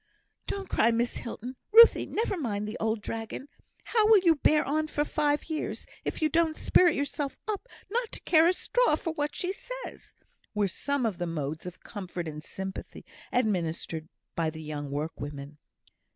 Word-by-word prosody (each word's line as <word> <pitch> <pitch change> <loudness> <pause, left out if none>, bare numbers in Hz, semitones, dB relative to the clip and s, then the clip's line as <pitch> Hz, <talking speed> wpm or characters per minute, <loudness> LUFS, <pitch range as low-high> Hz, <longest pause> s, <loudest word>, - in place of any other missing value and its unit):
"Don't 395 -1 -3
cry, 230 - +3
Miss 235 +1 0
Hilton," 245 +2 -6
"Ruthie, 465 +2 +8
never 440 -2 -1
mind 210 - -2
the 215 - -5
old 220 -1 0
dragon," 225 +6 -5 0.3
"How 440 -2 +3
will 440 -1 +8
you 355 -4 +5
bear 305 0 +3
on 310 +2 0
for 295 -1 0
five 295 -1 +1
years, 315 -1 -3 0.2
if - - -3
you - - +6
don't 320 0 +2
spirit 350 0 +4
yourself 285 0 -2
up 430 +3 -3 0.2
not 470 +2 -1
to - - -5
care 325 -1 +5
a 360 - +4
straw - - +2
for 325 +1 -3
what 295 -1 -2
she 370 +1 -1
says?" - - -8 0.4
were 205 -1 +2
some 280 +7 -1
of 200 -6 -1
the 175 - -1
modes 155 0 -3
of 180 - -9
comfort 180 -5 -5
and 155 0 -6
sympathy 190 +3 -7 0.3
administered 170 -8 -1 0.3
by 165 -1 +1
the 160 0 -8
young 150 -2 -5
workwomen. 145 0 -5
250 Hz, 175 wpm, -29 LUFS, -, 0.4 s, Ruthie